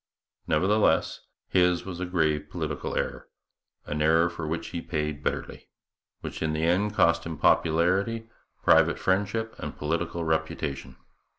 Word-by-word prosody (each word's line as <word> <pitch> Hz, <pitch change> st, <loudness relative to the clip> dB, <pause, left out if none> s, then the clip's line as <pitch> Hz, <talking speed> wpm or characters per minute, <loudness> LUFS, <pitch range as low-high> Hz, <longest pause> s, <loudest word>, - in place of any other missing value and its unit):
Nevertheless, 95 Hz, +7 st, +2 dB, 0.3 s
his 90 Hz, -1 st, +2 dB
was 90 Hz, -2 st, -6 dB
a 90 Hz, -, -3 dB
grave 75 Hz, -4 st, 0 dB
political 75 Hz, -4 st, -4 dB
error -, -, -3 dB, 0.6 s
an 75 Hz, 0 st, -3 dB
error 80 Hz, +2 st, +4 dB
for 85 Hz, -2 st, -5 dB
which 80 Hz, +2 st, -3 dB
he 85 Hz, -, -4 dB
paid 75 Hz, -3 st, -3 dB
bitterly -, -, -4 dB, 0.5 s
which -, -, -6 dB
in 80 Hz, -1 st, 0 dB
the 80 Hz, +1 st, -1 dB
end 100 Hz, +5 st, +1 dB
cost 85 Hz, -2 st, +3 dB
him 80 Hz, -2 st, -5 dB
popularity, 95 Hz, +11 st, +2 dB, 0.4 s
private -, -, +5 dB
friendship, 100 Hz, +4 st, 0 dB
and -, -, -6 dB
political 85 Hz, +2 st, -2 dB
reputation. 80 Hz, -5 st, -2 dB
85 Hz, 135 wpm, -27 LUFS, 80-90 Hz, 0.6 s, private